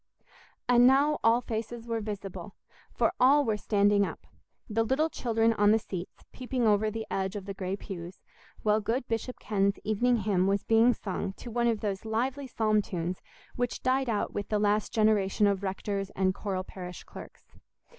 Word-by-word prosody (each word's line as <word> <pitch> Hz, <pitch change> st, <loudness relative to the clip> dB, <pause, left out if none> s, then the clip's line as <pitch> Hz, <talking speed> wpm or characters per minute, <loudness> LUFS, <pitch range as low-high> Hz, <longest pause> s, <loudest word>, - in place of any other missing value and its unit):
And 245 Hz, 0 st, +6 dB
now 285 Hz, +3 st, +4 dB
all 230 Hz, +2 st, +4 dB
faces 230 Hz, 0 st, -5 dB
were 230 Hz, -1 st, -2 dB
visible, 205 Hz, -2 st, -6 dB, 0.4 s
for -, -, +1 dB
all 280 Hz, +3 st, +5 dB
were 220 Hz, -2 st, +1 dB
standing 205 Hz, -1 st, +2 dB
up—the 215 Hz, +2 st, -6 dB
little 265 Hz, +8 st, +1 dB
children 225 Hz, -1 st, +1 dB
on 205 Hz, -1 st, +3 dB
the 220 Hz, -, +5 dB
seats 185 Hz, -4 st, -7 dB
peeping 255 Hz, -1 st, -2 dB
over 215 Hz, 0 st, +3 dB
the 220 Hz, +1 st, -5 dB
edge 190 Hz, +1 st, -2 dB
of 200 Hz, -2 st, -5 dB
the 200 Hz, -, -5 dB
grey 190 Hz, 0 st, -3 dB
pews, 180 Hz, -3 st, -8 dB, 0.4 s
while 215 Hz, 0 st, +3 dB
good 235 Hz, +4 st, -2 dB
Bishop 230 Hz, +2 st, -3 dB
Ken's 200 Hz, -1 st, 0 dB
evening 230 Hz, +4 st, +2 dB
hymn 195 Hz, -3 st, +1 dB
was 200 Hz, 0 st, +1 dB
being 225 Hz, +2 st, +4 dB
sung 195 Hz, 0 st, -4 dB
to 235 Hz, -, -10 dB
one 235 Hz, +1 st, +1 dB
of 225 Hz, -3 st, 0 dB
those 200 Hz, -2 st, -3 dB
lively 255 Hz, +5 st, -2 dB
psalm 215 Hz, -3 st, +1 dB
tunes 180 Hz, -2 st, -4 dB, 0.3 s
which 245 Hz, -1 st, -2 dB
died 260 Hz, 0 st, +1 dB
out 210 Hz, -3 st, -1 dB
with 205 Hz, -, -4 dB
the 210 Hz, -, +1 dB
last 210 Hz, 0 st, +1 dB
generation 215 Hz, -2 st, +2 dB
of 200 Hz, -1 st, +1 dB
rectors 195 Hz, 0 st, -3 dB
and 185 Hz, 0 st, +2 dB
choral 190 Hz, -2 st, -3 dB
parish 180 Hz, -1 st, -9 dB
clerks. -, -, -12 dB
215 Hz, 175 wpm, -29 LUFS, 200-235 Hz, 0.4 s, And